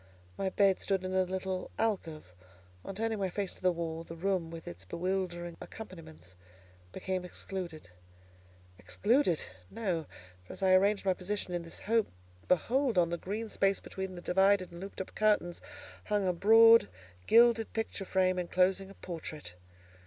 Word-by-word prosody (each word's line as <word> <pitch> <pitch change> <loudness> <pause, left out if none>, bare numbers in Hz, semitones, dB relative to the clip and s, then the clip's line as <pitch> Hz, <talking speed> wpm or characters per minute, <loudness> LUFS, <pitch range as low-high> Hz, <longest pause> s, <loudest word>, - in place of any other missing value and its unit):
My 195 - -1
bed 195 0 +3
stood 190 -1 -1
in 185 - -3
a 190 - +3
little 190 0 -3
alcove; 165 - -2 0.5
on 195 - -7
turning 225 +1 -1
my 190 -1 0
face 195 +1 -3
to - - -15
the 185 0 +3
wall, 165 -1 -4
the 165 - -9
room 180 -1 -1
with 165 0 -9
its 90 +2 -7
bewildering 175 - -3
accompaniments 95 - -10 0.6
became 185 - -3
excluded. 175 - -7 0.9
Excluded? 205 - +1 0.3
No! 180 -8 -2 0.4
For 90 - -10
as - - -6
I 190 -1 +5
arranged 200 +2 +3
my 190 - +3
position 185 0 -4
in 175 - -1
this 165 0 -7
hope, 225 0 +2 0.4
behold, 240 - +2
on 170 -1 +3
the 170 - -1
green 215 +4 -4
space 195 -2 +1
between 190 -1 -6
the 175 - -9
divided 190 0 +3
and 170 +1 -10
looped 195 0 -6
up 190 - -8
curtains, 210 -5 +1 0.4
hung 205 -2 0
a 180 - +2
broad, 225 - +7 0.4
gilded 230 0 +5
picture 225 -2 -3
frame 185 -1 +1
enclosing 185 +2 +1
a 195 - -13
portrait. 155 - -7
185 Hz, 160 wpm, -31 LUFS, 175-200 Hz, 0.9 s, broad